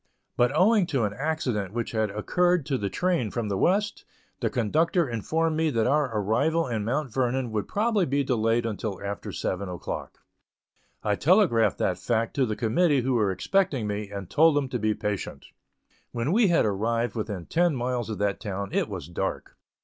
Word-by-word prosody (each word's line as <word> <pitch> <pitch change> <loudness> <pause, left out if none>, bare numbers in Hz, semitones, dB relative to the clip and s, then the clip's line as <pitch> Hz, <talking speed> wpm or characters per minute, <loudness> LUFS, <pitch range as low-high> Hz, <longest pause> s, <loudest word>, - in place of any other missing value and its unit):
but 120 +1 +3
owing 200 +2 +4
to 135 -8 0
an 105 -1 -1
accident 125 - -2
which 120 -1 -2
had 110 -2 0
occurred 175 - +1
to 140 - -1
the 100 -6 -2
train 175 - 0
from 115 0 -3
the 100 - -1
West, 205 +3 +1 0.4
the - - 0
conductor 160 - +1
informed 155 +8 -1
me 160 0 +1
that 115 -6 +1
our 140 0 +2
arrival 145 +11 +1
in 110 -4 -2
Mount 130 +2 -2
Vernon 130 -1 0
would 105 -2 -2
probably 210 -3 +1
be 140 +1 +1
delayed 115 -2 +1
until 105 -3 -3
after 100 0 -5
seven 95 +1 -3
o'clock. 90 -1 -6 0.9
I 105 - +1
telegraphed 160 - +3
that 90 -1 0
fact 115 +1 -1
to 130 -2 +3
the 110 - -2
committee 135 +6 +2
who 130 +2 0
were 110 -5 +2
expecting 135 - 0
me, 105 0 -3
and 100 -2 -6
told 160 - +4
them 140 -2 0
to 125 - -2
be 110 0 +1
patient. 105 -2 -4 0.7
When 120 +5 -1
we 220 +2 +4
had 170 -8 +3
arrived 115 +4 0
within 105 -6 -4
ten 170 -2 +2
miles 125 -2 -2
of 110 - -3
that 100 -1 -1
town 100 -1 -4
it - - 0
was - - -6
dark. - - -4
120 Hz, 190 wpm, -26 LUFS, 105-155 Hz, 0.9 s, owing